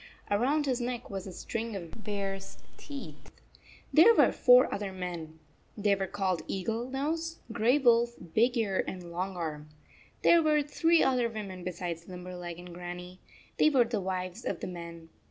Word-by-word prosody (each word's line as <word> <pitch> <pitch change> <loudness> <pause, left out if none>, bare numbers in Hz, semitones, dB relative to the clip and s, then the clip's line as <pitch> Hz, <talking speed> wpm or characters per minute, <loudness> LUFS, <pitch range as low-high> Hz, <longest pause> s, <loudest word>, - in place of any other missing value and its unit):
Around 270 +9 +2
his 255 -2 0
neck 245 -1 -4
was 195 -1 -5
a - - -6
string 225 +4 -4
of 190 +3 -8
bear 200 -1 -2
s 195 0 -9 0.2
teeth. 285 -2 -9 0.6
There 375 +9 +8
were - - +6
four 250 +1 +6
other 200 -1 -3
men. 175 -4 -6 0.4
They 205 -1 +3
were 195 -1 -1
called 185 -3 -1
Eagle 225 +6 -2
Nose, 320 +5 -2
Gray 235 +5 +3
Wolf, 235 -3 +4 0.2
Big 240 +5 +3
Ear, 200 -4 +1
and 180 -2 -6
Long 185 +2 -3
Arm. 155 -3 -4 0.5
There 340 - +7
were 305 -2 +3
three 325 +3 +3
other 250 -3 +2
34 230 - -9
women 190 -3 -7
besides 170 -2 -5
Limberleg 180 -1 -7
and 175 0 -10
Grannie. 180 +1 -8 0.4
They 310 - +5
were 265 -5 +5
the 225 -3 -2
wives 185 +2 -4
of - - -2
the - - -4
men. 170 -2 -8
200 Hz, 170 wpm, -30 LUFS, 180-245 Hz, 0.6 s, There